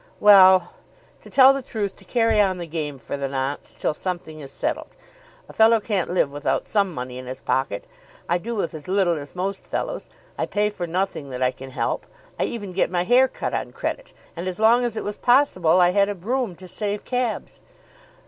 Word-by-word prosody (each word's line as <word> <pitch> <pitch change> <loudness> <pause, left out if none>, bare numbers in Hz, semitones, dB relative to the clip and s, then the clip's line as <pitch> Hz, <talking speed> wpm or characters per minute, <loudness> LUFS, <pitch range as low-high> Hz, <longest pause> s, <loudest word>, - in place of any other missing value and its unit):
"Well; 190 -3 +7 0.5
to - - -14
tell 270 0 +7
the 275 - -3
truth, 210 -5 -4
to 195 - -16
carry 225 0 +3
on 190 -2 +1
the 175 - -5
game 150 -3 -4
for 125 +3 -6
the 140 -1 -2
nonce 135 +1 -4
till - - -1
something 170 -2 -5
is 140 -2 -8
settled. - - -3 0.5
A - - -13
fellow 225 +1 +5
can't 205 -4 -1
live 175 -5 +1
without 145 +1 -1
some 200 -3 +1
money 125 -3 -6
in 130 - -9
his 130 +1 -6
pocket. 130 -7 -1 0.4
I 175 +1 +1
do 235 +6 -5
with 195 -6 -2
as 155 -2 -9
little 185 -4 +1
as 145 +3 -10
most 190 +2 -3
fellows. - - -4 0.3
I - - 0
pay 210 0 0
for 175 -4 -5
nothing 170 -5 -2
that 130 0 -3
I 125 - +3
can 135 +1 -10
help. 130 - -2 0.3
I - - +2
even 205 -5 -5
get 185 - +1
my 175 -1 0
hair 250 +7 +5
cut - - -5
on - - -3
credit, - - -4 0.2
and 175 +2 -5
as 185 +2 -4
long 230 +3 +5
as 230 -2 -3
it - - -2
was 205 0 -5
possible 215 - +3
I 175 0 +5
had 200 +1 +3
a 205 - -3
brougham, 225 +2 -2
to 185 +2 -12
save 205 +2 -3
cabs." 250 -3 -2
185 Hz, 215 wpm, -23 LUFS, 155-215 Hz, 0.5 s, Well